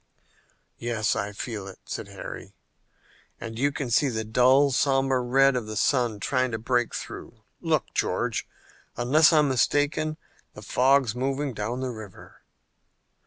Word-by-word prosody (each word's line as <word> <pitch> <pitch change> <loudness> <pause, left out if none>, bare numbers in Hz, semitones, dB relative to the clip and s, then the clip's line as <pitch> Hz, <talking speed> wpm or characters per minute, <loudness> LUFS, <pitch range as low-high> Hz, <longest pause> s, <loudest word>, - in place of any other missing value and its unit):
"Yes, 115 -2 0
I 100 +1 -2
feel 105 -1 -6
it," 95 - -10
said - - -6
Harry, - - -9 0.8
"and 115 0 -7
you 140 +2 +2
can 140 -5 -4
see 140 +4 +3
the 110 -2 -2
dull, 130 +5 +4
somber 135 -1 +2
red 135 +2 +4
of 120 -4 -2
the 110 - -6
sun 120 -2 +1
trying 130 +4 0
to - - 0
break 120 +1 0
through. - - -8 0.2
Look, - - -1
George, - - -1 0.5
unless 145 +7 +5
I'm 150 -2 +4
mistaken 145 +4 +1 0.4
the - - -10
fog's 130 -2 +3
moving 135 +2 -2
down 115 +4 -3
the 130 -1 -2
river!" 110 -4 -12
125 Hz, 145 wpm, -26 LUFS, 115-135 Hz, 0.8 s, unless